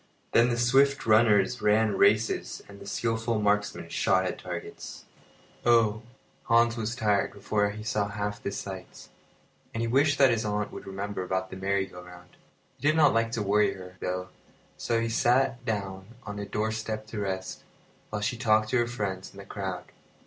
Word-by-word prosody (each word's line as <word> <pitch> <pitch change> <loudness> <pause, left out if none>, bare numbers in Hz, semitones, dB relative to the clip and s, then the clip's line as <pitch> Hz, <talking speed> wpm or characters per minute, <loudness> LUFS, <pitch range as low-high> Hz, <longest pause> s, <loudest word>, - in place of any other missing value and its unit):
Then 120 +1 +5
the 120 - 0
swift 135 +3 +3
runners 110 +1 +4
ran 105 0 +3
races, 105 +3 +2
and 100 0 -13
the - - -10
skilful 115 -1 -1
marksmen 105 0 0
shot - - +2
at - - -3
targets. - - -7 0.6
The - - 0
Saint 120 - +8
Bernard 115 - +3
Dog - - -6
Oh! 110 - -11 0.5
Hans 115 0 +4
was 115 +1 -3
tired 105 -5 +1
before 105 0 0
he 105 +1 -7
saw 105 -1 0
half 105 0 -4
the - - -3
sights; 95 -2 -8 0.7
and 115 - -1
he 115 - 0
wished 145 +5 +3
that 135 -2 +6
his 115 -1 0
aunt 105 0 -2
would - - -9
remember 100 +1 -4
about 95 0 -2
the - - -6
merry 95 0 0
go 90 -1 -11
round. 90 0 -14 0.4
He 145 - 0
did 155 - +4
not 150 -3 +5
like 115 0 +1
to 115 - -1
worry 105 +1 +3
her, 90 -1 -11
though, 90 0 -3 0.5
so 115 -1 0
he 115 - 0
sat 120 +2 +2
down 95 -3 -3 0.2
on 105 -1 -6
a 100 - -5
doorstep 110 +1 -2
to 110 0 -6
rest, 95 -2 -4 0.5
while 105 -1 -3
she 120 +3 -1
talked 110 -3 +2
to 130 - +2
her 120 -1 +2
friends 100 -5 -4
in - - -17
the 100 - -9
crowd. 95 -3 -5
105 Hz, 195 wpm, -28 LUFS, 100-115 Hz, 0.7 s, Saint